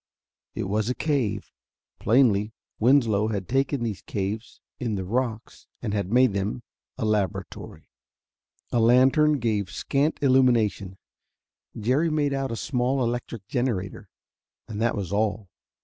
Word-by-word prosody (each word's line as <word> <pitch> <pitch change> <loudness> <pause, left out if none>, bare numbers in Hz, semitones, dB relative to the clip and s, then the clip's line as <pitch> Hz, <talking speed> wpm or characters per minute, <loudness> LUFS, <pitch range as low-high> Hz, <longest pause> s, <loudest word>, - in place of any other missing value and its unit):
It - - -2
was 105 +3 -1
a 125 - -1
cave. 140 -9 -1 0.5
Plainly 110 -3 +3 0.3
Winslow 115 -4 +3
had 100 -4 -3
taken 135 0 0
these 105 -5 -3
caves 105 +4 -4 0.2
in 115 -4 -2
the 95 -1 -3
rocks 115 +1 -3
and 105 -4 -3
had 100 -2 -2
made 125 0 +5
of 100 - -2
them 105 +5 -3 0.3
a - - -2
laboratory. 105 -4 -3 0.8
A 120 - +2
lantern 130 +6 +5
gave 110 -6 -1
scant 140 - 0
illumination: 115 -8 +2 0.8
Jerry 130 +10 +2
made 150 -2 0
out 135 -2 -2
a - - -2
small 130 +1 0
electric 120 -3 -3
generator, 115 -7 -2 0.6
and 110 -1 -5
that 120 0 +1
was 100 -3 -4
all. 105 -1 -1
115 Hz, 135 wpm, -25 LUFS, 105-130 Hz, 0.8 s, made